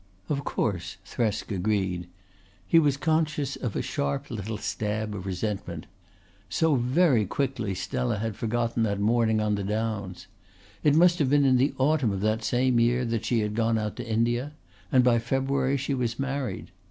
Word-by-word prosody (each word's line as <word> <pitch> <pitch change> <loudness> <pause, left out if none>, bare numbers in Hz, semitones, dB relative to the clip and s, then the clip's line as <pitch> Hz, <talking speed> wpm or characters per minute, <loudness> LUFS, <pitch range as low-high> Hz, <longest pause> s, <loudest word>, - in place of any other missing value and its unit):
"Of 140 -1 -1
course," 90 -11 -2
Thresk 110 -2 -2
agreed. 95 -2 -1 0.6
He 165 - +5
was 145 -3 +2
conscious 155 -3 0
of 120 -6 -4
a - - -1
sharp 70 0 -2
little 110 -1 -4
stab 105 0 -3
of 95 -1 -6
resentment. 95 -3 -3 0.6
So 160 - +2
very 130 0 +3
quickly 120 -6 -2
Stella 120 +4 -2
had 110 0 -3
forgotten 115 +1 -1
that 100 -3 0
morning 110 +1 +2
on 105 -1 +1
the 100 -1 -1
Downs! 100 -3 -3 0.6
It 150 -1 +4
must 175 +1 +5
have 140 -4 +2
been 145 0 +4
in 130 -1 +5
the 135 +4 +1
autumn 135 -4 +2
of 95 -1 -3
that 110 +2 0
same 125 +1 +2
year 120 +2 +2
that 115 -1 -2
she 115 -1 +1
had 105 0 -2
gone 115 0 +1
out 105 -1 -3
to 120 -1 -6
India, 120 +5 0 0.4
and 130 -1 +5
by 120 -1 +4
February 135 +3 0
she 135 +1 -2
was 120 -3 -1
married. 135 -6 -3
115 Hz, 175 wpm, -27 LUFS, 105-135 Hz, 0.6 s, He